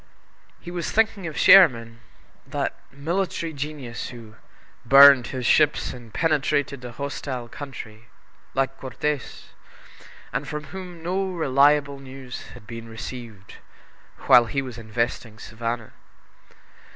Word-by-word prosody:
He 175 Hz, -, -9 dB
was 175 Hz, -2 st, -3 dB
thinking 220 Hz, -4 st, +1 dB
of 155 Hz, -, -7 dB
Sherman 115 Hz, -12 st, +6 dB, 0.5 s
that -, -, -2 dB, 0.2 s
military 165 Hz, +3 st, -2 dB
genius 140 Hz, -5 st, -6 dB
who 115 Hz, -3 st, -11 dB, 0.5 s
"burned 135 Hz, 0 st, +8 dB
his 130 Hz, -2 st, -5 dB
ships 150 Hz, +4 st, +3 dB
and 120 Hz, -3 st, -12 dB
penetrated 145 Hz, -3 st, 0 dB
a 120 Hz, -1 st, -8 dB
hostile 130 Hz, -1 st, -5 dB
country," 115 Hz, -5 st, -9 dB, 0.5 s
like 135 Hz, 0 st, -1 dB
Cortez, 135 Hz, +2 st, -4 dB, 0.8 s
and 140 Hz, +3 st, -3 dB
from 150 Hz, +2 st, -5 dB
whom 180 Hz, -3 st, -8 dB
no 190 Hz, +3 st, -1 dB
reliable 145 Hz, -3 st, +2 dB
news 130 Hz, -2 st, -9 dB
had -, -, -14 dB
been 115 Hz, 0 st, -9 dB
received 115 Hz, -3 st, -9 dB, 0.7 s
while 120 Hz, -1 st, +7 dB
he 135 Hz, +4 st, -2 dB
was 125 Hz, -3 st, -8 dB
investing 115 Hz, 0 st, -3 dB
Savannah. 115 Hz, +1 st, -5 dB
135 Hz, 115 wpm, -24 LUFS, 120-150 Hz, 0.8 s, burned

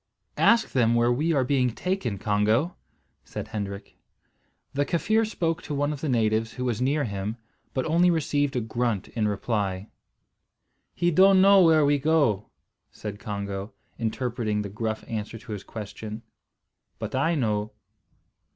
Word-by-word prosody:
"Ask 230 Hz, 0 st, +4 dB
them 120 Hz, -3 st, +3 dB
where 120 Hz, +1 st, +3 dB
we 150 Hz, +7 st, +1 dB
are 140 Hz, -5 st, +3 dB
being 130 Hz, -1 st, +2 dB
taken, 180 Hz, -, -2 dB
Congo," 110 Hz, -, +1 dB, 0.5 s
said -, -, -7 dB
Hendrik. 100 Hz, -1 st, -6 dB, 0.7 s
The 145 Hz, -, +1 dB
Kaffir 215 Hz, +9 st, +1 dB
spoke 165 Hz, -6 st, -1 dB
to 150 Hz, -, -5 dB
one 145 Hz, +1 st, 0 dB
of 145 Hz, -, -8 dB
the 155 Hz, -, -1 dB
natives 110 Hz, -2 st, +1 dB
who 125 Hz, -, -4 dB
was 120 Hz, -2 st, -1 dB
near 145 Hz, +3 st, +1 dB
him, 100 Hz, 0 st, -3 dB, 0.4 s
but 130 Hz, -, 0 dB
only 170 Hz, +3 st, +4 dB
received 145 Hz, -4 st, +1 dB
a 125 Hz, -, +1 dB
grunt 115 Hz, -2 st, -2 dB
in 110 Hz, -2 st, -1 dB
reply. 100 Hz, -2 st, -2 dB, 1.0 s
"He 175 Hz, 0 st, +2 dB
don't 190 Hz, +3 st, +6 dB
know 195 Hz, 0 st, +7 dB
where 160 Hz, -3 st, +5 dB
we 145 Hz, 0 st, +3 dB
go," 140 Hz, -9 st, +2 dB, 0.4 s
said 105 Hz, -1 st, -7 dB
Congo, 100 Hz, -1 st, -5 dB, 0.3 s
interpreting 115 Hz, -2 st, -1 dB
the 100 Hz, -, -5 dB
gruff 110 Hz, +2 st, -3 dB
answer 110 Hz, 0 st, -4 dB
to 110 Hz, -, -11 dB
his 100 Hz, -2 st, -5 dB
question, 110 Hz, +1 st, -7 dB, 0.7 s
"but -, -, -5 dB
I 160 Hz, +6 st, +2 dB
know." 105 Hz, -5 st, 0 dB
120 Hz, 150 wpm, -26 LUFS, 105-150 Hz, 1.0 s, know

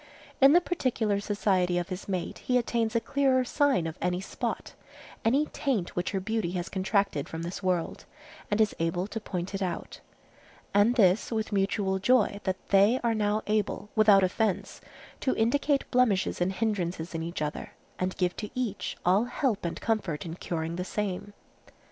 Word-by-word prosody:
In 275 Hz, +2 st, +8 dB
the 350 Hz, -, +6 dB
particular 240 Hz, -, 0 dB
society 190 Hz, -3 st, +1 dB
of 175 Hz, 0 st, -2 dB
his 185 Hz, 0 st, -6 dB
mate 185 Hz, -3 st, -3 dB
he 250 Hz, -, +1 dB
attains 230 Hz, -1 st, 0 dB
a -, -, +5 dB
clearer 265 Hz, 0 st, +2 dB
sight 275 Hz, -, +2 dB
of 160 Hz, -1 st, -5 dB
any 180 Hz, 0 st, 0 dB
spot, 190 Hz, -, -4 dB, 0.5 s
any 270 Hz, +7 st, +3 dB
taint 245 Hz, -, -2 dB
which 175 Hz, -, -1 dB
her 195 Hz, -, -1 dB
beauty 205 Hz, -3 st, -2 dB
has 180 Hz, -1 st, -3 dB
contracted 195 Hz, -5 st, 0 dB
from 165 Hz, 0 st, -5 dB
this 175 Hz, +2 st, -5 dB
world, 180 Hz, -3 st, -1 dB, 0.4 s
and 205 Hz, -, 0 dB
is 215 Hz, -1 st, +3 dB
able 165 Hz, +2 st, 0 dB
to 220 Hz, +2 st, -5 dB
point 185 Hz, -3 st, -5 dB
it 195 Hz, -, -3 dB
out, 180 Hz, -3 st, -4 dB, 0.7 s
and 205 Hz, +4 st, +4 dB
this 195 Hz, -2 st, +3 dB
with 220 Hz, -1 st, -2 dB
mutual 195 Hz, -1 st, 0 dB
joy 210 Hz, -1 st, +3 dB
that 190 Hz, -1 st, -3 dB
they 200 Hz, +6 st, +5 dB
are 235 Hz, -1 st, +2 dB
now 210 Hz, 0 st, 0 dB
able, 210 Hz, 0 st, -1 dB
without 210 Hz, -3 st, +6 dB
offence, 190 Hz, +1 st, -1 dB, 0.4 s
to 260 Hz, -, 0 dB
indicate 275 Hz, +5 st, +2 dB
blemishes 230 Hz, -9 st, +2 dB
and 185 Hz, +2 st, +1 dB
hindrances 180 Hz, -6 st, -2 dB
in 165 Hz, -, -3 dB
each 170 Hz, +2 st, -4 dB
other, 150 Hz, -, -5 dB, 0.3 s
and 185 Hz, 0 st, -2 dB
give 180 Hz, -1 st, 0 dB
to 210 Hz, -, -5 dB
each 240 Hz, -6 st, -3 dB
all 190 Hz, +6 st, +4 dB
help 245 Hz, -3 st, -1 dB
and 170 Hz, -, -4 dB
comfort 195 Hz, -10 st, -1 dB
in 165 Hz, -, -5 dB
curing 165 Hz, -1 st, -4 dB
the 180 Hz, -, -2 dB
same. 205 Hz, +1 st, -3 dB
200 Hz, 175 wpm, -28 LUFS, 180-225 Hz, 0.7 s, In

